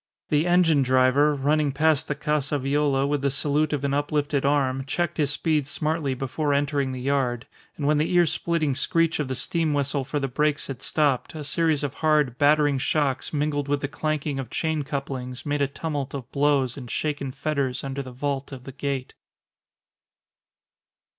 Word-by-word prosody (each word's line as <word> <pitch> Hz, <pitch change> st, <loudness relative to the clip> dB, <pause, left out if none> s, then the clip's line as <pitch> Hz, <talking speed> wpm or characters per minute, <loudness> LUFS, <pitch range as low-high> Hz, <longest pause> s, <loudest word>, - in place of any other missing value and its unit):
The 150 Hz, +3 st, +2 dB
engine 175 Hz, -4 st, +4 dB
driver, 130 Hz, +3 st, +3 dB
running 145 Hz, +1 st, +1 dB
past 155 Hz, +1 st, +2 dB
the 150 Hz, -, -2 dB
Casa 150 Hz, -1 st, -1 dB
Viola 140 Hz, 0 st, +1 dB
with 145 Hz, 0 st, 0 dB
the 140 Hz, -, +2 dB
salute 145 Hz, +3 st, 0 dB
of 145 Hz, -2 st, -2 dB
an 140 Hz, -1 st, 0 dB
uplifted 145 Hz, 0 st, 0 dB
arm, 135 Hz, -2 st, +1 dB
checked 175 Hz, +4 st, -2 dB
his 150 Hz, -3 st, +2 dB
speed 150 Hz, -1 st, 0 dB
smartly 150 Hz, -2 st, -1 dB
before 140 Hz, +3 st, -1 dB
entering 140 Hz, -1 st, 0 dB
the 130 Hz, -, -5 dB
yard; 125 Hz, -3 st, 0 dB, 0.3 s
and 145 Hz, -, -3 dB
when 150 Hz, +1 st, +3 dB
the 155 Hz, -, 0 dB
ear 175 Hz, -1 st, +5 dB
splitting 160 Hz, -3 st, 0 dB
screech 165 Hz, +4 st, +1 dB
of 150 Hz, -, -1 dB
the 130 Hz, -, -3 dB
steam 160 Hz, +2 st, 0 dB
whistle 140 Hz, 0 st, 0 dB
for 145 Hz, +3 st, -2 dB
the 135 Hz, -, -1 dB
brakes 150 Hz, +3 st, 0 dB
had 135 Hz, -2 st, -7 dB
stopped, 145 Hz, -1 st, 0 dB
a 155 Hz, -, -5 dB
series 155 Hz, 0 st, +1 dB
of 140 Hz, -2 st, -2 dB
hard, 150 Hz, -5 st, +1 dB
battering 145 Hz, -1 st, +4 dB
shocks, 140 Hz, -1 st, 0 dB
mingled 145 Hz, -1 st, -1 dB
with 145 Hz, 0 st, 0 dB
the 145 Hz, -, -1 dB
clanking 150 Hz, -1 st, -2 dB
of 130 Hz, -4 st, -5 dB
chain 160 Hz, +1 st, -1 dB
couplings, 135 Hz, -3 st, -5 dB
made 145 Hz, 0 st, -1 dB
a 140 Hz, -, +3 dB
tumult 145 Hz, -1 st, -4 dB
of 130 Hz, -4 st, -7 dB
blows 140 Hz, -3 st, +1 dB
and 125 Hz, -3 st, -8 dB
shaken 145 Hz, -2 st, -2 dB
fetters 140 Hz, -3 st, -2 dB
under 135 Hz, 0 st, -3 dB
the 130 Hz, -2 st, -8 dB
vault 140 Hz, +2 st, -3 dB
of 130 Hz, -2 st, -8 dB
the 135 Hz, -, -8 dB
gate. 135 Hz, -1 st, -4 dB
145 Hz, 185 wpm, -25 LUFS, 135-150 Hz, 0.3 s, ear